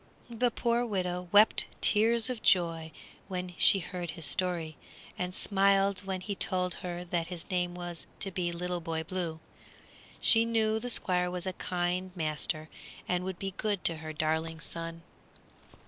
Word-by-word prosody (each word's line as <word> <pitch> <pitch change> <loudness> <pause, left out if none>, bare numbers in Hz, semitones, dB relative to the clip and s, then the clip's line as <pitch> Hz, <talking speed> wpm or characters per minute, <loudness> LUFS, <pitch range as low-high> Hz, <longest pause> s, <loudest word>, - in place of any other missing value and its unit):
The 240 +1 +2
poor 235 +1 +1
widow 180 -5 -2
wept 210 +2 +6
tears 225 +2 +4
of 250 -3 -3
joy 165 -3 +2 0.4
when 180 -2 -4
she - - +6
heard 180 -1 -5
his 160 0 -5
story, 170 -4 0 0.4
and 180 0 -4
smiled 195 -1 +3
when 190 -1 -3
he 200 +2 -3
told 180 -2 +3
her 175 -1 -4
that 170 -1 -2
his 175 -2 -7
name 175 -1 0
was 175 -1 -6
to 195 - +2
be 175 -1 -1
Little 175 0 -3
Boy 160 -1 -3
Blue. 170 -2 -4 0.8
She 225 0 +5
knew 220 -1 +1
the 245 - -4
Squire 180 -5 +2
was 180 0 -4
a 185 - -2
kind 180 +1 -2
master 155 -1 -1 0.4
and 180 0 0
would 190 -1 -4
be 195 0 -4
good 205 -3 -1
to 165 - +1
her 155 0 -6
darling 160 +1 -1
son. 165 0 -6
180 Hz, 165 wpm, -30 LUFS, 170-195 Hz, 0.8 s, wept